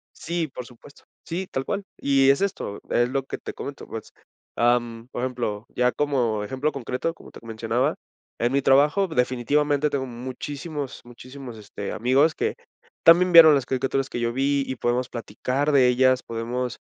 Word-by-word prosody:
Sí, 170 Hz, -1 st, -3 dB
por 125 Hz, -2 st, -8 dB
supuesto, 125 Hz, +4 st, -17 dB, 0.2 s
sí, 180 Hz, +3 st, -4 dB
tal 135 Hz, 0 st, -3 dB
cual, 200 Hz, 0 st, -2 dB
y 135 Hz, -1 st, +3 dB
es 140 Hz, -, +4 dB
esto, 185 Hz, -, -3 dB
es 120 Hz, +1 st, +2 dB
lo 135 Hz, 0 st, -1 dB
que -, -, -6 dB
te -, -, -7 dB
comento, 140 Hz, 0 st, -8 dB
pues, 110 Hz, -, -8 dB, 0.4 s
am, 120 Hz, -1 st, +1 dB
por 120 Hz, -, -4 dB
ejemplo, 120 Hz, -4 st, -3 dB
ya 125 Hz, 0 st, +1 dB
como 125 Hz, -8 st, 0 dB
ejemplo 130 Hz, +8 st, -2 dB
concreto, 135 Hz, +4 st, -3 dB
como 165 Hz, -, -15 dB
te -, -, -12 dB
mencionaba, 110 Hz, -1 st, -1 dB, 0.4 s
en 120 Hz, +1 st, +1 dB
mi 140 Hz, +1 st, +2 dB
trabajo 150 Hz, +9 st, +4 dB
definitivamente 145 Hz, +2 st, +1 dB
tengo 135 Hz, -2 st, -2 dB
muchísimos, 135 Hz, +4 st, -6 dB
muchísimos, 125 Hz, 0 st, -10 dB
este, 100 Hz, -1 st, -7 dB
amigos 135 Hz, +7 st, +3 dB
que -, -, -1 dB, 0.5 s
también 175 Hz, +2 st, +6 dB
vieron 160 Hz, -3 st, +9 dB
las 135 Hz, -, 0 dB
caricaturas 135 Hz, +1 st, -1 dB
que 120 Hz, -, -4 dB
yo 120 Hz, 0 st, 0 dB
vi 140 Hz, +1 st, +1 dB
y 130 Hz, -, -3 dB
podemos 125 Hz, +1 st, -1 dB
platicar 125 Hz, +6 st, -2 dB
de 130 Hz, -3 st, +5 dB
ellas, 130 Hz, +1 st, +3 dB
podemos 120 Hz, +2 st, -4 dB
130 Hz, 170 wpm, -24 LUFS, 120-145 Hz, 0.5 s, vieron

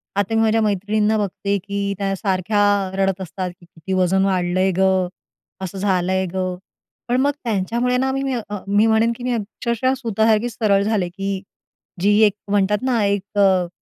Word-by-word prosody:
आता 200 Hz, +2 st, 0 dB
मी 225 Hz, -, +3 dB
माझ्या 225 Hz, 0 st, +3 dB
मैत्रिणींना 210 Hz, +1 st, +1 dB
बघते, 200 Hz, 0 st, -1 dB
की 200 Hz, +1 st, -3 dB
त्या 195 Hz, -1 st, -1 dB
सारख्या 195 Hz, +1 st, 0 dB, 0.4 s
रडत 195 Hz, -1 st, 0 dB
असतात, 185 Hz, +1 st, -4 dB
"की 175 Hz, -, -18 dB
किती 170 Hz, +3 st, -7 dB
वजन 185 Hz, +1 st, +2 dB
वाढलं 185 Hz, -1 st, 0 dB
आहे 190 Hz, 0 st, +3 dB
गं, 190 Hz, -1 st, +3 dB, 0.5 s
असं 190 Hz, +1 st, -5 dB
झालं 185 Hz, -2 st, 0 dB
आहे 190 Hz, 0 st, +1 dB
गं." 185 Hz, -1 st, -2 dB, 0.5 s
पण 245 Hz, +1 st, +1 dB
मग 285 Hz, -, +3 dB
त्यांच्यामुळे 235 Hz, +3 st, 0 dB
ना 265 Hz, +1 st, +1 dB
मी 270 Hz, +1 st, -2 dB, 0.4 s
मी 205 Hz, +3 st, +3 dB
म्हणेन, 225 Hz, +1 st, +3 dB
की 245 Hz, -, -9 dB
मी 250 Hz, -, -1 dB
अक्षरशः 235 Hz, +3 st, -1 dB
सुतासारखी 225 Hz, -1 st, +1 dB
सरळ 200 Hz, -4 st, +1 dB
झाले, 205 Hz, -5 st, 0 dB
की 195 Hz, +1 st, -4 dB, 0.6 s
जी 205 Hz, +2 st, +4 dB
एक 205 Hz, -, +2 dB, 0.2 s
म्हणतात 205 Hz, 0 st, +2 dB
ना, 245 Hz, -4 st, +1 dB
एक 200 Hz, +1 st, -2 dB
अ, 190 Hz, -3 st, +4 dB
200 Hz, 175 wpm, -21 LUFS, 190-220 Hz, 0.6 s, जी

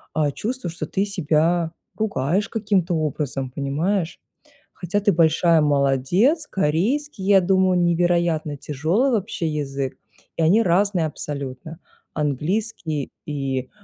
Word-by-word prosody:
э, 150 Hz, -2 st, +2 dB
чувствую, 230 Hz, -6 st, -4 dB
что 160 Hz, -2 st, -5 dB
ты 195 Hz, +6 st, -1 dB
себя 165 Hz, -2 st, +1 dB, 0.3 s
ругаешь 200 Hz, -2 st, 0 dB
каким-то 200 Hz, -5 st, 0 dB
образом, 145 Hz, -4 st, -2 dB
понимаешь. 160 Hz, +7 st, -1 dB, 0.5 s
Хотя 180 Hz, +3 st, -2 dB
ты 205 Hz, -, +3 dB
большая 165 Hz, 0 st, +4 dB
молодец, 145 Hz, -, +2 dB
корейский, 195 Hz, -, -1 dB
я 195 Hz, -1 st, +6 dB
думаю, 185 Hz, 0 st, +3 dB
невероятно 170 Hz, -3 st, +1 dB
тяжёлый 165 Hz, -, 0 dB
вообще 205 Hz, -6 st, -1 dB
язык, 140 Hz, -3 st, -3 dB, 0.4 s
и -, -, 0 dB
они 200 Hz, +8 st, +5 dB
разные 180 Hz, -1 st, +2 dB
абсолютно: 145 Hz, +1 st, -6 dB, 0.3 s
английский 155 Hz, -, -2 dB, 0.2 s
и 135 Hz, -3 st, -3 dB
170 Hz, 115 wpm, -22 LUFS, 150-195 Hz, 0.5 s, я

